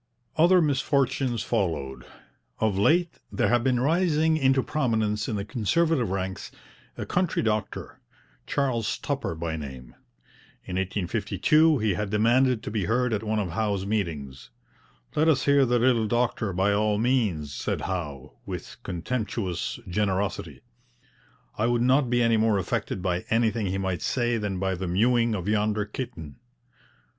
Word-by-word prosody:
Other 175 +2 +5
misfortunes 135 -4 0
followed. 85 - -2 0.5
Of 110 -3 +1
late 165 - +2
there - - +1
had 120 -1 +2
been 125 -1 +2
rising 160 +2 +2
into 135 -3 +3
prominence 110 -7 0
in 110 - -1
the 100 -1 -3
Conservative 135 - +1
ranks 95 0 -3 0.5
a - - -4
country 180 -1 0
doctor, 110 -2 -2 0.5
Charles 125 -6 0
Tupper 140 - -3
by 80 0 -3
name. 65 -5 -8 0.7
In 90 - -6
1852 110 - +2
he 110 -4 +1
had 100 +3 -3
demanded 120 +3 +3
to 105 - -5
be 105 -4 -1
heard 125 +3 +1
at 105 - 0
one 110 0 -1
of 100 -5 -1
Howe's 100 0 -1
meetings. 80 - -3 0.7
'Let 155 +2 +3
us 140 -5 +3
hear 140 -2 +4
the 120 +1 +2
little 120 -2 +3
doctor 120 -2 0
by 95 +3 +1
all 105 0 +1
means,' 105 - 0
said - - -3
Howe, 75 -8 -5
with - - -7
contemptuous 95 0 -3
generosity. 100 +1 -2 1.0
'I 110 - +2
would 120 -1 +1
not 130 +1 +3
be 120 0 +2
any 115 -1 +3
more 110 -1 +3
affected 95 -1 -2
by 90 -1 -1
anything 110 -2 +1
he 95 +1 -1
might 95 -2 -2
say 120 -2 0
than 105 -3 -2
by 95 +1 -1
the 95 0 -4
mewing 115 +5 +2
of 95 -1 -4
yonder 105 0 +1
kitten.' 105 - -7
110 Hz, 150 wpm, -26 LUFS, 95-125 Hz, 1.0 s, Other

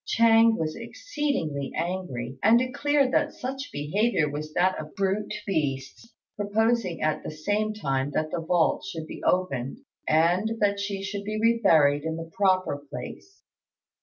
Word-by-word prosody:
Ch'êng 230 0 +5
was 155 -1 -2
exceedingly 230 - -3
angry, 135 -9 -4
and 225 +3 +6
declared 275 +2 +1
that 295 0 +1
such 270 +2 -5
behaviour 160 +4 +1
was 150 +1 -5
that 185 +3 +2
of 155 0 -9
brute 195 +2 -1
beasts, 145 - -3 0.2
proposing 210 -2 0
at 155 0 0
the - - -6
same 205 +8 -1
time 135 -10 -1
that 155 +1 -2
the 175 - -2
vault 165 0 +1
should 160 -1 -6
be - - -9
opened 140 - 0 0.3
and 175 +8 +3
that 200 -1 +2
she 200 -1 -3
should 200 +1 -4
be 215 +1 -3
re 230 +1 +3
buried 145 -6 +5
in 160 0 -2
the 165 0 -7
proper 185 -6 +2
place. 390 +2 -9
190 Hz, 155 wpm, -26 LUFS, 155-225 Hz, 0.3 s, and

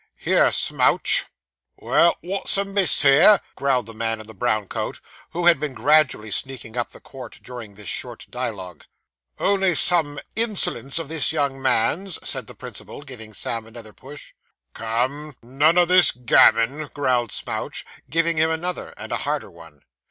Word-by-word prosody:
'Here, - - +2
Smouch!' - - +2 0.5
'Well, 170 - +2
wot's 195 +2 0
amiss 195 -3 +2
here?' 160 +9 +6 0.2
growled 135 -4 0
the 115 - -10
man 115 0 -2
in 110 - -10
the 110 - -12
brown 110 -1 -1
coat, - - -5 0.3
who 175 +1 -3
had 170 -5 +6
been 145 -3 -4
gradually 145 -8 +2
sneaking 125 -1 -2
up 120 -1 -2
the - - -14
court 130 -4 -12
during 120 -5 -10
this 105 -1 -12
short - - -5
dialogue. 100 -9 -6 0.5
'Only 195 -3 +1
some 155 -5 +3 0.2
insolence 195 - 0
of 165 - -3
this 160 0 -1
young 140 -4 -1
man's,' 135 - 0
said - - -4
the - - -12
principal, - - -10
giving 120 -6 -10
Sam 115 +2 -3
another 115 -2 -11
push. 140 +2 -13 0.4
'Come, 130 +6 -3
none 145 +8 +2
o' 175 - +6
this 180 +1 +5
gammon,' 125 +4 +3
growled 125 -6 0
Smouch, - - -5 0.2
giving 165 +2 +1
him 160 +1 +3
another, 175 +2 -4
and - - -9
a - - 0
harder - - -3
one. 80 -4 -16
135 Hz, 160 wpm, -22 LUFS, 115-165 Hz, 0.5 s, here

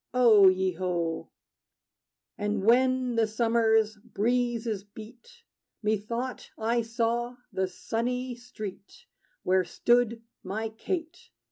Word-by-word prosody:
O 220 -6 +7
ye 185 0 +3
ho! 170 -2 -2 1.1
And 205 -1 -2
when 255 +1 +3
the 225 -1 +3
summer's 220 -1 +2
breezes 230 -1 -1
beat, 230 - -14 0.4
Methought 225 +4 -2
I 230 +2 +1
saw 235 +1 -1 0.2
the 190 0 0
sunny 245 +6 -3
street 235 - -9 0.4
Where 185 0 +3
stood 235 +5 +1 0.2
my 215 +4 -3
Kate. 330 - -5
225 Hz, 100 wpm, -28 LUFS, 205-245 Hz, 1.1 s, O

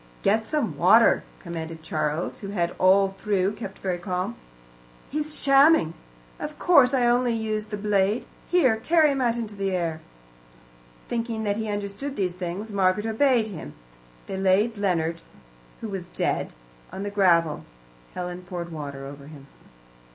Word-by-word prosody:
"Get 220 +2 +2
some 285 - -1
water," 215 +9 +5
commanded 165 -2 -7
Charles, 155 +1 -2
who 200 - -7
had 175 -4 -1
all 195 +1 +5
through 200 -3 +1
kept 200 -3 -8
very 180 -2 -2
calm. 185 +4 -3 0.8
"He's 300 +1 -3
shamming. 275 - +5 0.5
Of - - -6
course 280 -8 +5
I 255 -3 +2
only 240 0 +3
used 215 -1 -2
the 210 - -4
blade. 205 +1 +1 0.2
Here, 270 -11 +4
carry 310 +5 +3
him 270 -1 -1
out 240 -2 +1
into 220 -3 -4
the 195 -1 -2
air." 165 -3 -2 1.1
Thinking 230 -1 -2
that 205 -1 0
he 220 -1 -3
understood 205 +7 -4
these 185 -3 -1
things, 180 +4 -5
Margaret 195 +1 +1
obeyed 230 +1 +3
him. 155 - -8 0.5
They 190 - -5
laid 195 +4 +2
Leonard, 170 -5 -1 0.6
who 225 - -4
was 185 -3 -6
dead, - - -2 0.4
on 195 - -5
the 205 - -4
gravel; 170 -6 +3 0.5
Helen 180 0 -5
poured 175 -1 -6
water 140 -3 -6
over 140 0 -10
him. 145 -3 -12
200 Hz, 150 wpm, -25 LUFS, 175-225 Hz, 1.1 s, water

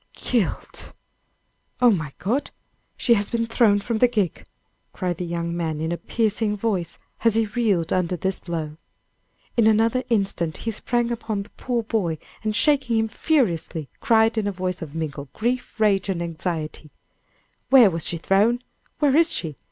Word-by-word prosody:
"Killed! 235 -7 -2 0.9
Oh, 245 -1 +6
my 155 -8 -1
God! 240 +10 -1 0.5
she 240 - +3
has 205 -2 +1
been 230 -1 0
thrown 225 -3 +3
from 220 +2 -2
the 250 - +6
gig!" 210 -8 -1 0.5
cried 180 -2 -2
the 180 - -3
young 170 0 -3
man, 160 -3 -2
in 160 +1 -2
a 175 - -1
piercing 215 -1 -1
voice, 195 -6 -2 0.3
as 230 -2 +4
he 225 0 +3
reeled 210 -6 0
under 180 -1 0
this 190 +2 -2
blow. 160 -3 -5 0.8
In 230 -2 +4
another 225 +3 +3
instant 195 -7 0
he 225 - -3
sprang 240 +2 -1
upon 220 -3 -3
the - - -19
poor 240 -2 -2
boy 195 -8 -1 0.3
and 215 -1 -1
shaking 265 -3 +2
him 220 0 +1
furiously, 175 - 0
cried 225 0 +3
in 205 - -1
a - - 0
voice 185 -1 -3
of 155 -2 -7
mingled 145 -4 -5
grief, 245 +1 -2
rage 200 -3 +2
and 185 -3 -1
anxiety: 165 -2 -4 0.8
"Where 250 -7 +7
was 165 -2 -1
she 170 - -1
thrown? 210 +8 +2 0.3
Where 285 -3 +3
is 330 +1 +5
she? 155 -4 -2
205 Hz, 165 wpm, -23 LUFS, 170-230 Hz, 0.9 s, Where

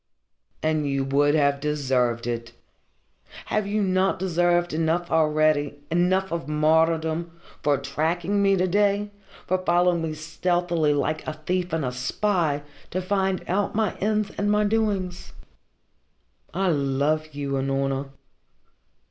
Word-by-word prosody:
"And 155 -2 +1
you 135 -1 0
would 145 +2 +2
have 140 -2 +2
deserved 130 -5 0
it. 115 -1 -4 1.0
Have 210 -1 +1
you 210 +1 0
not 190 0 +1
deserved 175 -1 +1
enough 165 +2 0
already, 155 -2 +2
enough 185 +3 +2
of 165 -5 -3
martyrdom, 160 +2 +1 0.2
for 145 -1 +2
tracking 165 +8 -1
me 195 0 +4
to 185 - +2
day, 205 +2 +1 0.3
following 180 -1 +2
me 160 -1 -3
stealthily, 165 -1 0
like 155 +2 -2
a 155 - -2
thief 180 +4 -2
and 160 -3 -1
a 125 - -1
spy, 150 +3 0 0.3
to 185 - -2
find 190 0 0
out 200 +3 0
my 220 -1 0
ends 210 0 0
and 205 +1 +1
my 210 0 +3
doings?" 205 -4 -1 1.2
"I 190 +2 0
love 145 +1 0
you, 140 -1 -3
Unorna." 135 0 -1
165 Hz, 130 wpm, -24 LUFS, 145-185 Hz, 1.2 s, me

